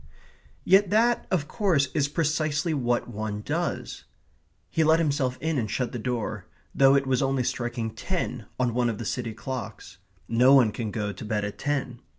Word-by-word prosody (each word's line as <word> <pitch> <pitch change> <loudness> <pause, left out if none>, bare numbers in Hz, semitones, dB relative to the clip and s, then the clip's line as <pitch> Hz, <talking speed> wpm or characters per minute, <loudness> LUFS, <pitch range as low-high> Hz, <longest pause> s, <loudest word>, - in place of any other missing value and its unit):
Yet 195 +1 +5
that, 230 +4 +2
of 160 -6 0
course, 160 - +1
is 140 -2 +2
precisely 155 +1 0
what 120 -4 0
one 110 -2 -4
does. - - -3 0.7
He 160 - +2
let 160 +1 +5
himself 140 -5 0
in 160 -3 -1
and 110 -3 -2
shut 125 +2 -2
the 120 - -5
door, 120 -1 -3 0.3
though 135 0 +5
it 140 0 +2
was 130 -2 +1
only 135 -1 +1
striking 120 -2 -2
ten 125 - -3
on 125 -2 +1
one 120 0 +1
of 110 - -3
the 115 - -6
city 115 -1 -3
clocks. 120 -6 -7 0.3
No 125 +4 +5
one 120 -6 +5
can 110 0 -4
go 105 -1 -3
to - - -9
bed 105 -1 -1
at 100 - -6
ten. 135 -4 -2
130 Hz, 180 wpm, -26 LUFS, 115-150 Hz, 0.7 s, Yet